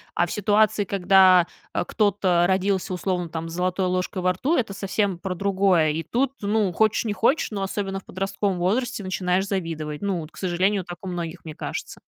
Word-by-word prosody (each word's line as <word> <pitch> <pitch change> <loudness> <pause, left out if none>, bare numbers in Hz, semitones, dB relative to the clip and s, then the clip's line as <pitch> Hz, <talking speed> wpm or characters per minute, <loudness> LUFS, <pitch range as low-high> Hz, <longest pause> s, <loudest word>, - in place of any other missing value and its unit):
а 175 - +3
в 175 - -8
ситуации, 210 0 +2
когда, 185 -2 +5 0.3
а, - - 0
кто-то 185 -3 +2
родился, 190 0 0
условно, 180 -1 -2
там, 165 0 -5
с - - -8
золотой 185 +1 0
ложкой 185 +1 -2
во 185 0 +3
рту, 275 - 0
это 225 -5 -1
совсем 195 -1 -1
про 185 0 -4
другое, 190 -4 +2
и 160 +2 -2
тут, 260 +7 0
ну, 205 -1 +1
хочешь, 215 +4 +2
не 220 -3 -1
хочешь, 235 +9 +1
но 200 -2 -3
особенно 195 0 -3
в - - -21
подростковом 195 +1 -2
возрасте 215 +6 0
начинаешь 185 0 0
завидовать, 165 -6 -3
ну 195 -4 -1
вот, 155 +1 -10
к - - -18
сожалению, 185 +1 0
так 175 0 -8
у 190 - -6
многих, 175 -1 -5
мне 155 -2 -8
кажется. - - -6
190 Hz, 200 wpm, -24 LUFS, 175-200 Hz, 0.3 s, когда